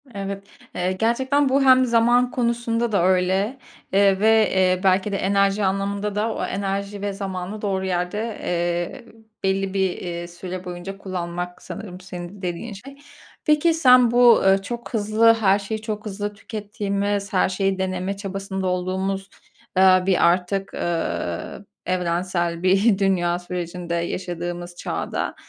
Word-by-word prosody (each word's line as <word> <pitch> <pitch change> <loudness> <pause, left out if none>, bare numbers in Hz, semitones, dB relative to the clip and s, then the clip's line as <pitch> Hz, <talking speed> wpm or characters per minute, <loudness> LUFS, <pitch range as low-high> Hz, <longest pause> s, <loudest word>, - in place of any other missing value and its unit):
Evet, 200 0 -4 0.3
eee, 180 +1 0
gerçekten 260 +8 +1
bu 275 +1 +3
hem 260 -1 +6
zaman 240 +1 +3
konusunda 235 -1 0
da 200 -5 +2
öyle, 190 +6 +1 0.4
eee, 195 -1 +4
ve, 220 0 +4
eee, 185 -1 +2
belki 190 +2 +2
de 195 - 0
enerji 200 +1 +2
anlamında 200 +1 -1
da 220 +2 0
o - - -2
enerji 200 +1 -3
ve 205 0 -2
zamanı 195 +1 -5
doğru 190 -2 -1
yerde, 190 +5 -2
eee, 175 +6 -2 0.4
belli 195 0 0
bir, 190 -1 +2
eee, 175 -1 -5
süre 180 +1 -7
boyunca 180 +2 -6
kullanmak 180 -2 -5
sanırım 190 -3 -8
senin 180 +1 -8
dediğin 180 +5 -4
şey. 275 +8 -11 0.5
Peki, 305 +2 +4
sen 250 -6 +6
bu, 245 -1 +7
ııı, 195 0 +4
çok 235 +5 -7
hızlı, 220 +1 +4
her 205 -3 +3
şeyi 215 +2 -4
çok 215 -1 -5
hızlı 205 0 -4
tükettiğimiz, 205 -1 -3
her 185 - +3
şeyi 195 0 0
deneme 185 +1 -2
çabasında 195 -1 -4
olduğumuz, 190 +2 -2 0.5
eee, 185 -1 +6
bir 190 -2 +4
artık, 185 +3 0
eee, 85 - -3 0.3
evrensel 175 -1 -1
bir 195 +3 +4
dünya 175 -3 +1
sürecinde 175 -1 -4
yaşadığımız 175 0 -4
çağda, - - -3
195 Hz, 140 wpm, -23 LUFS, 180-210 Hz, 0.5 s, bu